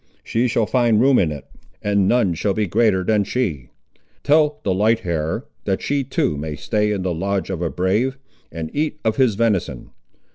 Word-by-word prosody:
She 120 +2 0
shall 115 -1 +1
find 120 -2 +2
room 130 +2 +4
in 80 -4 +1
it, 75 - -7 0.3
and 100 -2 +1
none 120 -7 +2
shall 95 +4 -1
be 110 - +1
greater 95 0 +2
than 105 +1 +2
she. 90 - -2 0.5
Tell 150 0 +3
the 95 - +1
light 110 +4 +2
hair, 80 -2 -2 0.2
that 95 - 0
she 140 -1 0
too 125 - -1
may 75 +1 -4
stay 105 +8 0
in 100 -3 -2
the 90 -1 -1
lodge 95 +2 -2
of 90 -3 -4
a 85 - 0
brave, 110 +11 0 0.3
and 80 -1 -6
eat 155 +1 -1
of 110 - +1
his 130 -6 +3
venison. 100 - -1
105 Hz, 190 wpm, -21 LUFS, 90-120 Hz, 0.5 s, room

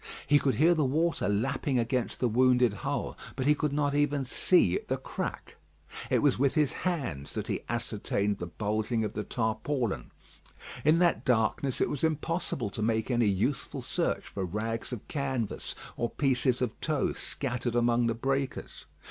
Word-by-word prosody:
He 145 0 +5
could 135 -5 +1
hear 160 +8 +5
the 155 -3 +1
water 155 +1 +1
lapping 130 +6 0
against 120 +1 -1
the 125 - +2
wounded 125 0 +4
hull, 100 - -3 0.2
but 130 - -2
he 150 - +6
could 150 0 -1
not 145 0 +1
even 145 -1 +1
see 125 - +3
the - - 0
crack. - - -5 0.5
It - - +2
was 145 -4 +3
with 140 +2 +2
his 150 -3 +3
hands 130 - -3
that - - -2
he - - -1
had 120 - 0
ascertained 105 -3 -1
the 85 - -4
bulging 110 +5 -1
of 105 - -3
the 105 - -3
tarpaulin. 120 +1 -1 0.7
In 155 +2 +5
that 175 0 +3
darkness 125 +2 +1
it - - +2
was 145 - -4
impossible 160 - -1
to - - -5
make 110 +2 0
any 120 -2 +3
useful 100 +8 -1
search - - -1
for 100 - -5
rags 110 +7 -3
of 120 -4 -6
canvas 135 -7 -2 0.2
or 120 - -1
pieces 130 -2 +1
of 115 -4 -4
tow 155 -3 0
scattered 120 -3 -3
among 120 0 +3
the 115 - 0
breakers. 135 +2 -3
125 Hz, 175 wpm, -29 LUFS, 110-145 Hz, 0.7 s, he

